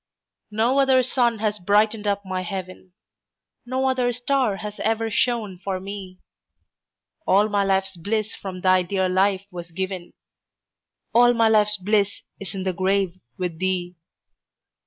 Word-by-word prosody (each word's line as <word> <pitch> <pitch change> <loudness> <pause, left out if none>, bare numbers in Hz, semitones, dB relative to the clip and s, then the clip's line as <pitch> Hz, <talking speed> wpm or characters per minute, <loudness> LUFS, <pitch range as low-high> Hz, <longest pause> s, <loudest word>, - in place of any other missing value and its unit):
No 230 +6 +2
other 265 -2 +4
sun 240 -2 +1
has 210 -1 -1
brightened 210 +3 +2
up 200 0 0
my 185 -1 -2
heaven, 185 0 -7 0.7
No 260 +1 0
other 255 -2 +1
star 250 -3 0
has 210 0 -7
ever 225 0 0
shone 215 -6 0
for 190 -2 -2
me; 190 -1 -8 1.1
All 200 +3 +4
my 205 -1 +2
life's 195 -1 0
bliss 215 +5 -2
from 185 -2 -7
thy 185 0 +4
dear 190 +1 0
life 190 +1 +1
was 175 -1 -8
given, 185 0 -5 1.0
All 240 +1 +6
my 225 -1 +4
life's 210 -1 +4
bliss 200 +1 0 0.2
is 195 -2 -7
in 190 - -3
the 185 -1 -1
grave 185 0 0 0.2
with 175 -4 -3
thee. 180 -1 -1
200 Hz, 145 wpm, -23 LUFS, 185-220 Hz, 1.1 s, All